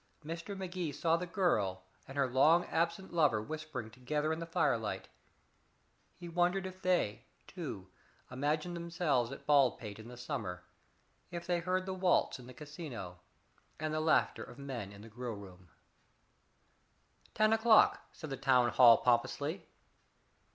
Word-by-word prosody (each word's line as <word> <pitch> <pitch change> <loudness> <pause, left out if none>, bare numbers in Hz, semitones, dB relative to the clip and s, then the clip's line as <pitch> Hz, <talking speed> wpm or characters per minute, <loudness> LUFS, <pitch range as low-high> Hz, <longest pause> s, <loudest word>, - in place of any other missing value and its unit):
Mr. 170 +5 -5
Magee 180 -4 -3
saw 160 +4 +1
the 180 +2 -3
girl 105 - 0 0.2
and 135 - -9
her 140 -1 +3
long 155 +8 +4
absent 170 +3 -1
lover 150 -10 +3
whispering 135 -2 -6
together 150 +6 -1
in 160 - -4
the 165 - -5
firelight; 165 - 0 1.1
he 175 - -9
wondered 180 +3 +1
if 185 0 -8
they, 175 - +1 0.2
too, 140 - -7 0.4
imagined 150 +6 -1
themselves 165 -8 0
at 135 - -9
Baldpate 125 -7 +2
in 110 - -10
the 125 0 -10
summer; 105 -8 -4 0.7
if 170 -1 -6
they 175 -1 +1
heard 185 +2 -1
the 190 - -3
waltz 185 -6 +2
in 125 - -12
the 130 - -10
casino, 145 - -8 0.6
and 155 0 -2
the 155 - 0
laughter 160 - +2
of - - -12
men 130 -8 -6
in 100 0 -12
the - - -11
grill 120 0 -5
room. 95 -3 -13 1.7
Ten 215 +1 +4
o'clock, 225 0 +5
said 155 -3 -9
the 135 - -3
town 130 -3 +4
hall 120 -3 +8
pompously. 120 -2 0
150 Hz, 150 wpm, -33 LUFS, 120-175 Hz, 1.7 s, hall